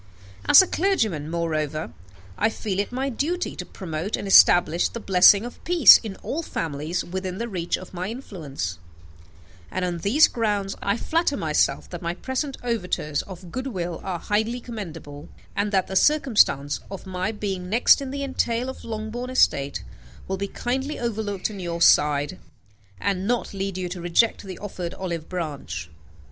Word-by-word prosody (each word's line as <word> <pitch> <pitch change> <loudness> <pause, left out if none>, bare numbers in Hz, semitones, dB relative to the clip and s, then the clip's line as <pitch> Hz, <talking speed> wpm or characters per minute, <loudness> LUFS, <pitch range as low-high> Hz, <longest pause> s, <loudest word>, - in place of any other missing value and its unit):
As 290 - +10
a - - -4
clergyman, 220 - 0
moreover, 155 -2 -2 0.4
I 220 - +2
feel 205 -3 -3
it 200 - -1
my 265 +2 -2
duty 325 +8 -2
to - - -7
promote 175 +1 -4
and - - -5
establish 175 -3 +6
the 235 - -6
blessing 195 +1 +6
of 245 - -10
peace 335 - +8
in 215 -4 -7
all 315 - -2
families 160 - -3
within 185 +1 -4
the 235 - -3
reach 175 -6 -2
of 185 - -12
my 180 +1 -3
influence; 155 - -6 0.9
and 185 -1 -2
on 175 -1 -3
these 230 - +5
grounds 205 -4 -1
I 200 +2 0
flatter 330 +7 0
myself - - +1
that - - -6
my 170 0 -3
present 260 +5 -3
overtures 180 -10 -1
of 180 -2 -11
good 255 +5 -4
will 175 -8 -4
are 185 -2 -3
highly 220 +6 -1
commendable, 165 -11 -8 0.3
and 205 0 0
that 190 -2 +2
the 190 - -6
circumstance 215 - +3
of 195 -1 -8
my 185 +2 -2
being 195 -4 -4
next 235 +6 +5
in 275 - -4
the 280 +1 -4
entail 250 -2 -1
of 260 - -8
Longbourn 225 +3 -5
estate 140 - +2 0.4
will 190 - -2
be 200 +1 -3
kindly 265 +8 -3
overlooked 215 -4 -2
on 200 - -8
your 170 -2 -4
side, 150 0 +4 0.6
and 195 -1 -1
not 240 -2 -1
lead 195 -1 -3
you 185 -1 -3
to 180 0 -6
reject 175 +7 +2
the 190 -3 -8
offered 185 -4 -6
olive 170 -4 -5
branch. 140 - -5
195 Hz, 170 wpm, -24 LUFS, 170-235 Hz, 0.9 s, As